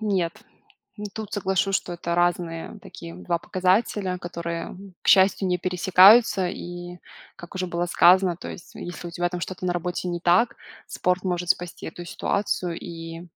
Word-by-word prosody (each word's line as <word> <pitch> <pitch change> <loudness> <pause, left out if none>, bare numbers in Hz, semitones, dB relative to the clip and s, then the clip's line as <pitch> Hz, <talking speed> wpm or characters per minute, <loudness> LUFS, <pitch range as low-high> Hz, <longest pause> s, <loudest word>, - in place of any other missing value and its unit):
нет. 190 -6 0 0.8
Тут 220 -2 -7
соглашусь, 195 -1 0
что 175 - -2
это 170 0 -3
разные 175 -1 -1
такие 85 0 -10
2 90 - -2
показателя, 185 0 0
которые, 170 0 -5 0.3
к - - -11
счастью, 190 0 +5
не 180 0 +1
пересекаются, 185 +3 +5
и 175 0 -7 0.4
как 175 0 -12
уже 185 0 -1
было 175 0 -1
сказано, 180 0 +5
то - - -8
есть, 175 - -11
если 175 0 -7
у - - -8
тебя 175 +1 -1
там 180 0 -5
что-то 185 0 -5
на 175 - +1
работе 175 +1 -3
не 175 0 -3
так, 180 +8 +3 0.3
спорт 180 +1 -1
может 180 -1 -2
спасти 175 -1 -1
эту 175 +2 -8
ситуацию, 180 -2 -2
и 165 -1 -8
175 Hz, 160 wpm, -24 LUFS, 170-185 Hz, 0.8 s, счастью